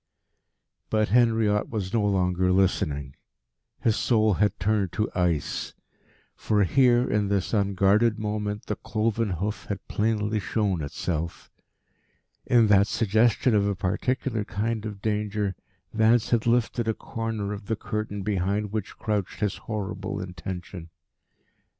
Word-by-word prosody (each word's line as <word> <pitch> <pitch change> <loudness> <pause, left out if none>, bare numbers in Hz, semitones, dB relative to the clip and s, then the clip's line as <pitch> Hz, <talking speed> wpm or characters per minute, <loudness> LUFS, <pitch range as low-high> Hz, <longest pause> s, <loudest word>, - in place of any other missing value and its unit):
But 110 -1 +1
Henriot 110 -3 +3
was 100 -5 -4
no 115 -3 +2
longer 90 -2 +1
listening. 75 -8 0 0.7
His 110 - +2
soul 110 -3 +3
had 105 +2 +1
turned 100 -2 +1
to 105 0 -1
ice. 90 -4 -1 0.6
For 105 -1 +1
here, 125 +4 +4
in 105 -1 +1
this 100 0 -1
unguarded 100 +2 +3
moment, 105 -1 -3
the 105 - -3
cloven 110 -1 -1
hoof 95 +4 -3
had 100 -2 -5
plainly 105 0 0
shown 100 -3 -1
itself. 80 +3 -4 1.0
In 120 -2 +5
that 100 -1 +5
suggestion 115 +4 +2
of 100 -1 +3
a 100 - 0
particular 110 +5 -1
kind 110 +1 -2
of 100 -2 -9
danger 105 -2 -1 0.4
Vance 110 +1 +3
had 115 -1 +2
lifted 120 0 +1
a 110 - +1
corner 110 -3 -4
of 100 -1 -8
the 110 - 0
curtain 105 -1 -4
behind 100 +1 -1
which 110 -2 -4
crouched 105 -4 -2
his 105 -2 0
horrible 100 -2 -4
intention. 90 -1 -7
105 Hz, 130 wpm, -26 LUFS, 95-110 Hz, 1.0 s, In